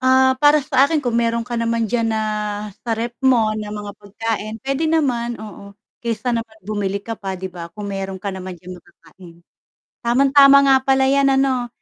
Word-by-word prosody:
Ah, 260 0 +4
para 295 0 +5
sa 275 -2 +4
akin 310 -1 -1
kung 235 -2 0
meron 230 0 0
ka 240 -1 -4
naman 230 0 0
diyan 230 -2 +1
na 220 -1 -1 0.6
sa 230 -2 -2
ref 235 +1 -3
mo 240 -5 +3
na 210 -1 -5
mga 205 -1 -6
pagkain, 215 +1 -4
pwede 275 +3 -1
naman, 245 -7 0
oo. 200 -2 -11 0.3
Kaysa 235 +1 -2
naman 225 -1 -5
bumili 200 -2 -2
ka 225 +2 -5
pa 195 -1 -4
‘di 190 - -5
ba, 170 -2 -8
kung 205 -1 -6
meron 195 -1 -4
ka 200 - -2
naman 185 -1 -7
diyan 180 +2 -10
makakain. 170 +1 -18 0.6
Tamang-tama 275 +3 +6
nga 270 - +6
pala 265 0 +3
‘yan 275 0 +3
ano. 260 -2 +1
230 Hz, 190 wpm, -20 LUFS, 205-265 Hz, 0.6 s, Tamang-tama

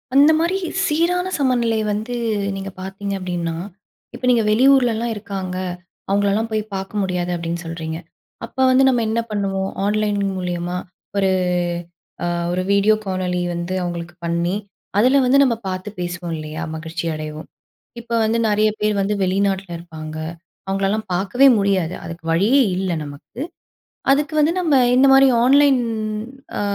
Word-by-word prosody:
அந்த 285 +3 +7
மாரி 340 +4 +1 0.3
சீரான 345 +3 +1
சமநிலை 245 -5 +1
வந்து 215 +4 -2 0.4
நீங்க 195 0 -5
பார்த்தீங்க 195 +1 -5
அப்படின்னா, 175 -2 -3 0.6
இப்ப - - -12
நீங்க 235 -2 +4
வெளியூர்லல்லாம் 235 -1 +4
இருக்காங்க, 195 -3 -5 0.5
அவங்களல்லாம் 200 +3 +1
போய் 215 -1 0
பார்க்க 195 +2 -3
முடியாது 180 -2 -1
அப்படீன்னு 170 0 -3
சொல்றீங்க. 160 -1 -4 0.5
அப்ப - - -19
வந்து 260 +1 +5
நம்ம 250 -3 +3
என்ன 225 +1 +1
பண்ணுவோம் 195 -2 -1 0.2
ஆன்லைன் 210 0 +1 0.2
மூலியமா 175 -1 -3 0.4
ஒரு 195 -1 +3 0.9
அ - - 0 0.3
ஒரு 180 +1 0
வீடியோ 200 +2 +4
காணொலி 185 -2 -1
வந்து 170 +2 -3
அவங்களுக்கு 175 0 -5
பண்ணி, 170 +2 0 0.4
அதில 255 +6 +5
வந்து 255 +2 +4
நம்ம 250 -4 +2
பார்த்து 185 +2 -4
பேசுவோம் 175 -1 -4
இல்லையா? 155 +1 -5
மகிழ்ச்சி 165 +2 -5
அடைவோம். 155 0 -6 0.5
இப்ப 235 0 -18
வந்து 225 +1 +1
நெறைய 210 +1 +3
பேர் 210 0 +2
வந்து 205 +2 0
வெளிநாட்டில 195 0 0
இருப்பாங்க. 155 -2 -8 0.5
அவங்களல்லாம் 195 +3 0
பார்க்கவே 205 +9 +4
முடியாது. 190 -4 +1
அதுக்கு 165 0 -8
வழியே 215 +11 +4 0.2
இல்லை 185 -2 -1
நமக்கு. 145 - -10 0.7
அதுக்கு 300 +3 0
வந்து 305 +2 +3
நம்ம 325 -5 +2 0.2
இந்த 265 +2 +6
மாரி 270 0 +7 0.2
ஆன்லைன் 275 0 +5 0.8
அ - - -1
195 Hz, 140 wpm, -20 LUFS, 175-235 Hz, 0.9 s, அந்த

